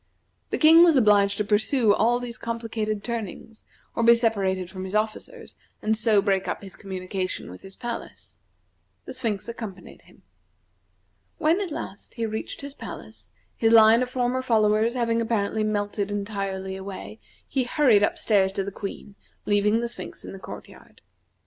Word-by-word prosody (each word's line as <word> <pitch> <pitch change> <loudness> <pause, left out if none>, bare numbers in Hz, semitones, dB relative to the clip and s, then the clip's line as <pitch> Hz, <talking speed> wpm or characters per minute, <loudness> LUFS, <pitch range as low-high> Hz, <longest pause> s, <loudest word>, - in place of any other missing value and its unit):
The - - -1
King 325 +2 +8
was 335 -3 +6
obliged 205 -5 +4
to 210 - +1
pursue 215 +2 +3
all 235 +4 +2
these 245 0 -6
complicated 225 -2 -3
turnings, 225 -1 -6 0.3
or - - 0
be 235 +1 +7
separated 195 -6 0
from 185 +1 -7
his 190 +2 -4
officers, 220 - -3 0.2
and 220 +1 +1
so 215 -2 +3
break 195 -2 +1
up - - -3
his 195 - -10
communication 185 - -5
with 90 - -11
his 195 0 -12
palace. 240 -1 -7 0.7
The - - -7
Sphinx 210 -5 -2
accompanied 215 -6 -8
him. - - -22 1.1
When 335 +3 +2
at 385 - -3
last, 205 -9 -7
he 230 -2 -2
reached 220 0 -5
his 280 0 -7
palace, 110 - -10 0.3
his 225 0 +2
line 225 +1 +7
of 250 - -1
former 255 0 0
followers 220 -1 +2
having 230 -2 +1
apparently 220 -1 0
melted 205 -1 -1
entirely 195 -2 -3
away, 190 - -8 0.3
he 265 -2 0
hurried 245 -5 +4
up 205 - +1
stairs 195 -3 +2
to 195 - -1
the 200 - -5
Queen, 200 +1 -7 0.3
leaving 210 +2 +2
the 235 - -1
Sphinx 235 - -8
in - - -7
the 195 - -9
court - - -9
yard. - - -18
215 Hz, 170 wpm, -25 LUFS, 200-235 Hz, 1.1 s, King